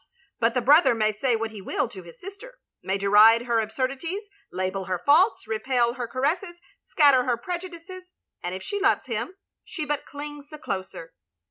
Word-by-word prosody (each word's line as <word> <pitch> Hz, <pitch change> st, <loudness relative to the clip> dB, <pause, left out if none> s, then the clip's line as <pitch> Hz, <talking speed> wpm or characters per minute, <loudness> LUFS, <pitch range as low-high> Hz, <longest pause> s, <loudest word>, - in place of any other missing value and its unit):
But 230 Hz, +1 st, +1 dB
the 250 Hz, -, +2 dB
brother 290 Hz, 0 st, +5 dB
may 215 Hz, -1 st, +1 dB
say 235 Hz, +3 st, 0 dB
what 225 Hz, 0 st, -3 dB
he 210 Hz, -2 st, -9 dB
will -, -, -1 dB
to 190 Hz, -, -10 dB
his 170 Hz, -1 st, -15 dB
sister; 410 Hz, +7 st, -11 dB, 0.2 s
may 190 Hz, +1 st, -1 dB
deride 210 Hz, +4 st, +6 dB
her 235 Hz, -2 st, +1 dB
absurdities, 270 Hz, -, -3 dB, 0.2 s
label 185 Hz, +1 st, -3 dB
her 185 Hz, 0 st, -2 dB
faults, 320 Hz, -, +3 dB
repel 235 Hz, +2 st, 0 dB
her 245 Hz, -1 st, -5 dB
caresses, 345 Hz, -, -2 dB, 0.2 s
scatter 280 Hz, -5 st, +4 dB
her 245 Hz, -2 st, +1 dB
prejudices; 360 Hz, +4 st, -8 dB, 0.3 s
and 180 Hz, +1 st, -4 dB
if 190 Hz, -, -7 dB
she 405 Hz, -, -3 dB
loves 395 Hz, -, +2 dB
him, 235 Hz, -, -4 dB, 0.3 s
she 345 Hz, -5 st, -6 dB
but 295 Hz, -1 st, -3 dB
clings 290 Hz, 0 st, -8 dB
the 305 Hz, -, -9 dB
closer. 190 Hz, -, -6 dB
255 Hz, 175 wpm, -25 LUFS, 215-330 Hz, 0.3 s, deride